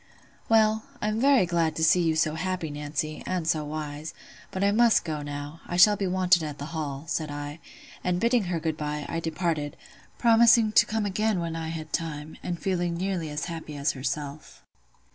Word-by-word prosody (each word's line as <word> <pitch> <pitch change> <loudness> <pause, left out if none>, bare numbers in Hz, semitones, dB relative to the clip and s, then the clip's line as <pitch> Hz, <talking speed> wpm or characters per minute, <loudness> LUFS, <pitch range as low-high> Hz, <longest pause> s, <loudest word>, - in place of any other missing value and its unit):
"Well, 220 -1 +4
I'm 215 +2 -1
very 270 -7 +5
glad 165 -2 0
to 160 - -1
see 175 +3 +5
you 165 -2 +1
so 155 -1 +2
happy, 175 -1 -3
Nancy, 150 +1 -3
and 180 -3 -2
so 155 -2 +1
wise: 150 0 -5 0.3
but 190 - -3
I 200 - +4
must 230 -1 +4
go 155 -3 -3
now; 145 +2 -6
I 175 - -3
shall 205 +4 +7
be 195 -1 -2
wanted 180 -1 +3
at 150 -2 -5
the 145 - -6
Hall," 145 -3 -4
said 155 -2 -2
I; 145 +1 -6 0.4
and 180 -1 0
bidding 235 -1 +2
her 175 -2 -1
good 160 -1 -2
bye, 150 -1 -3
I 165 - -2
departed, 160 -3 -2 0.4
promising 230 -1 +5
to - - +5
come 220 -1 -1
again 210 0 0
when 165 -1 -3
I 165 -1 -4
had 160 -1 -6
time, 155 -2 -3
and 175 -1 -4
feeling 175 -3 -1
nearly 180 -3 -2
as 150 -1 -3
happy 160 -3 -6
as 140 +1 +1
herself. 140 +2 -5
165 Hz, 195 wpm, -27 LUFS, 150-185 Hz, 0.4 s, shall